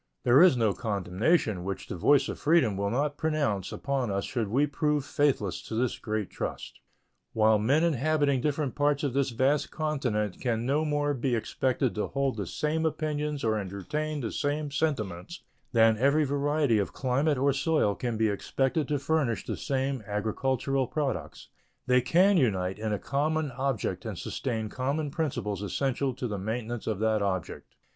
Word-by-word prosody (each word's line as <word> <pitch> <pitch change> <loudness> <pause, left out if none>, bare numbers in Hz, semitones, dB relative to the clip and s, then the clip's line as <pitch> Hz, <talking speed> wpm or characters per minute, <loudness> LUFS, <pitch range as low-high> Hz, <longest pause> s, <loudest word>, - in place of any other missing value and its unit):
There 125 +5 +6
is 180 -8 +6
no 110 -4 +2
condemnation 105 - 0
which 95 +1 -4
the - - -6
voice 140 - +4
of - - -5
freedom 155 - +3
will 100 +1 -1
not 145 +5 -1
pronounce 145 - -1
upon 135 -4 -2
us 100 0 -1
should 115 -5 -2
we 130 +8 +2
prove 150 0 0
faithless 135 -12 0
to 110 - -4
this 125 +1 0
great 110 -3 -3
trust. - - -5 0.5
While 110 -1 +4
men 135 +9 +2
inhabiting 145 -3 +2
different 150 -1 -1
parts 145 0 +1
of 140 -4 0
this 140 0 +1
vast 130 +5 +1
continent 125 - -2
can 115 -2 -1
no 145 +4 +1
more 145 -1 0
be 130 -1 0
expected 125 +3 0
to 105 - -2
hold 135 -2 -1
the 100 -4 -4
same 155 - -1
opinions 150 -2 -2
or 110 -1 +1
entertain 145 +11 -3
the 115 - -3
same 145 0 -2
sentiments 140 - -2 0.3
than 115 -2 +4
every 140 +4 +4
variety 145 -3 +1
of 100 - -2
climate 135 +3 +1
or 140 +2 +2
soil 140 -6 +1
can 120 +1 -3
be 110 0 +2
expected 135 +8 -1
to 150 - 0
furnish 140 -4 0
the - - -3
same 135 -2 -2
agricultural 130 +5 -1
products, 145 0 -3 0.4
they 125 0 +4
can 180 +10 +4
unite 95 - +1
in 110 0 -2
a 105 - 0
common 150 +4 -1
object 130 -2 -2
and - - -4
sustain 110 -4 -3
common 140 +6 -2
principles 140 - -2
essential 130 +7 -1
to 125 - -3
the 105 -3 -4
maintenance 115 +3 -4
of 110 -3 0
that 110 0 +1
object. 95 -3 -3
130 Hz, 170 wpm, -28 LUFS, 110-145 Hz, 0.5 s, There